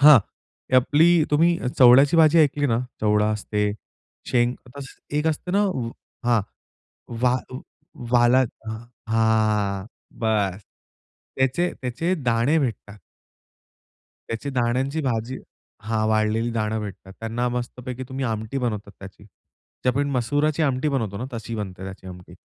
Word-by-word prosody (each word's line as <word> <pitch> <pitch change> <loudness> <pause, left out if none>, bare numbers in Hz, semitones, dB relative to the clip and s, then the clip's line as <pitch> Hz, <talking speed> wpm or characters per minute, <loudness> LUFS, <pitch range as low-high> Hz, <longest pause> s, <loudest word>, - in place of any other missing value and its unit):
हां, 145 -2 +9 0.5
ते 130 - +3
आपली 145 +6 +4 0.2
तुम्ही 160 +4 +4 0.3
चवड्याची 135 +5 +7
भाजी 160 0 +6
ऐकली 145 -2 +3
ना? 115 -2 +1 0.2
चवडा 105 0 +2
असते, 105 -1 -1 0.5
शेंग. 120 0 +2 0.2
आस 140 -1 -7 0.3
एक 150 - -1
असते 160 +3 -1
ना - - +4 0.7
हां. 115 -3 +4 0.8
वा 125 -1 +4 0.8
वाला 125 +1 +5 0.7
हां. 110 -3 +1 0.3
बस. 105 -4 0 0.8
त्याचे 135 +7 +1
त्याचे 130 +8 -1
दाणे 120 +6 +2
भेटतात. 110 -6 -4 1.3
त्याची 115 +5 -4
दाण्यांची 130 +4 0
भाजी. 125 0 -2 0.4
हा. 110 0 -1
वाळलेली 110 +2 +1
दाणे 110 -1 -1
भेटतात. 95 -2 -8
त्यांना 115 +2 -1
मस्तपैकी 125 +1 -5
तुम्ही 135 0 -4
आमटी 110 +2 -3
बनवता 105 -5 -3
त्याची. 100 +1 -12 0.6
जे - - +2
आपण 140 +3 -1
मसुराची 145 +5 0
आमटी 135 0 +1
बनवतो 115 -8 -2
ना, 125 - -4
तशी 115 0 -5
बनते 95 -3 -6
त्याची 95 0 -9
आमटी. 90 -1 -11
120 Hz, 125 wpm, -23 LUFS, 110-135 Hz, 1.3 s, हां